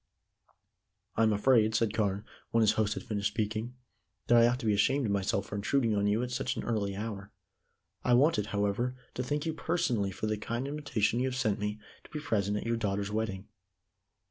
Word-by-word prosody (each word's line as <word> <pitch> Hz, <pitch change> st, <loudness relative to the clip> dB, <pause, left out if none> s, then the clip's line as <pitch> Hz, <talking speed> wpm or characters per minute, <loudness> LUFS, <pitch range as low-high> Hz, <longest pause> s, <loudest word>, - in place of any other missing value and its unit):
"I -, -, +1 dB
am 110 Hz, -1 st, +4 dB
afraid," 110 Hz, 0 st, +3 dB
said 110 Hz, -1 st, +2 dB
Carne, 105 Hz, -1 st, 0 dB, 0.2 s
when 115 Hz, -, +2 dB
his 110 Hz, -1 st, +5 dB
host 110 Hz, -1 st, 0 dB
had -, -, -5 dB
finished 105 Hz, -2 st, -1 dB
speaking, 110 Hz, +3 st, -3 dB, 0.5 s
"that 120 Hz, -, +4 dB
I 115 Hz, -, +7 dB
ought 120 Hz, +1 st, +1 dB
to -, -, -5 dB
be 105 Hz, -, +3 dB
ashamed 135 Hz, +7 st, +2 dB
of 105 Hz, -, 0 dB
myself 100 Hz, 0 st, 0 dB
for 105 Hz, -, -6 dB
intruding 115 Hz, +2 st, +1 dB
on 100 Hz, 0 st, +1 dB
you 105 Hz, +4 st, +2 dB
at 125 Hz, -, -4 dB
such 125 Hz, -, -1 dB
an -, -, -4 dB
early 100 Hz, -4 st, -1 dB
hour. 105 Hz, -1 st, -5 dB, 0.7 s
I 125 Hz, -, +4 dB
wanted, 125 Hz, -6 st, +3 dB
however, 105 Hz, +5 st, 0 dB, 0.2 s
to -, -, -3 dB
thank 145 Hz, +5 st, -2 dB
you 160 Hz, -, -1 dB
personally 125 Hz, -, 0 dB
for 95 Hz, -, -4 dB
the 110 Hz, 0 st, 0 dB
kind 115 Hz, +5 st, -3 dB
invitation 140 Hz, -6 st, 0 dB
you 130 Hz, -, +1 dB
have 130 Hz, -, -3 dB
sent 110 Hz, -6 st, 0 dB
me 105 Hz, +1 st, -3 dB, 0.2 s
to -, -, -16 dB
be 150 Hz, -, -5 dB
present 105 Hz, -8 st, 0 dB
at -, -, -4 dB
your 115 Hz, 0 st, 0 dB
daughter's 100 Hz, -2 st, -1 dB
wedding." 105 Hz, -3 st, -2 dB
110 Hz, 210 wpm, -30 LUFS, 105-125 Hz, 0.7 s, I